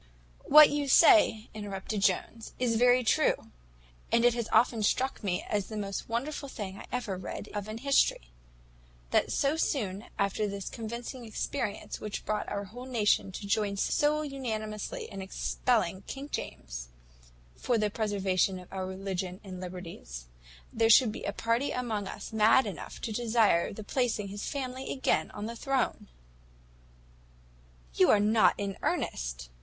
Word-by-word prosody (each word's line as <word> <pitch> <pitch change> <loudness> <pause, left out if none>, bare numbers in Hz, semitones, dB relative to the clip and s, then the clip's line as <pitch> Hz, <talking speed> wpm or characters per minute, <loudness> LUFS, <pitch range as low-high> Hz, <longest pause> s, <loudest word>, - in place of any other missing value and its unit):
"What 305 +1 +9
you 290 -1 -1
say," 270 - +6
interrupted 205 0 -4
Jones, 200 +4 0
"is 240 -2 +1
very 245 +2 +5
true; 225 - +1 0.6
and 235 +1 +4
it 245 - +5
has 235 -2 -3
often 230 -2 +4
struck 255 +4 0
me, 180 -3 -1
as 205 -2 -1
the 215 - -6
most 200 0 -4
wonderful 275 +4 -3
thing 200 -5 -6
I - - -10
ever 215 -7 -2
read 190 +2 -7
of 205 -1 -4
in 215 - -5
history, 230 - +2 0.8
that - - +2
so 280 +2 +1
soon 215 -10 -1
after 200 +1 0
this 200 -1 -5
convincing 235 +3 -6
experience 220 0 -4
which 210 -1 -5
brought 210 0 -2
our 200 0 -3
whole 245 +6 -9
nation 215 -5 +2
to 200 - -7
join 200 0 0
so 300 +8 +2
unanimously 220 -7 -4
in 195 - -7
expelling 190 0 0
King 275 +2 -6
James, - - -5 0.7
for 240 - 0
the 210 -1 0
preservation 195 -3 0
of 180 0 -12
our 190 -1 -3
religion 190 -1 -4
and 185 -2 -8
liberties, 170 - -8 0.5
there 225 0 +3
should 230 0 +7
be - - -7
a - - -1
party 230 +6 0
among 220 -5 -2
us 205 - -8
mad 220 +4 +5
enough 195 -7 -7
to 225 - -3
desire 220 -6 +2
the 215 +2 -8
placing 220 -3 -1
his 205 +1 -5
family 260 -1 -4
again 265 - +1
on 210 0 -6
the 230 +1 -5
throne." 265 0 -1 1.9
"You - - +4
are 210 - +6
not 215 +2 +4
in 200 -1 -4
earnest!" - - -2
215 Hz, 155 wpm, -30 LUFS, 195-245 Hz, 1.9 s, What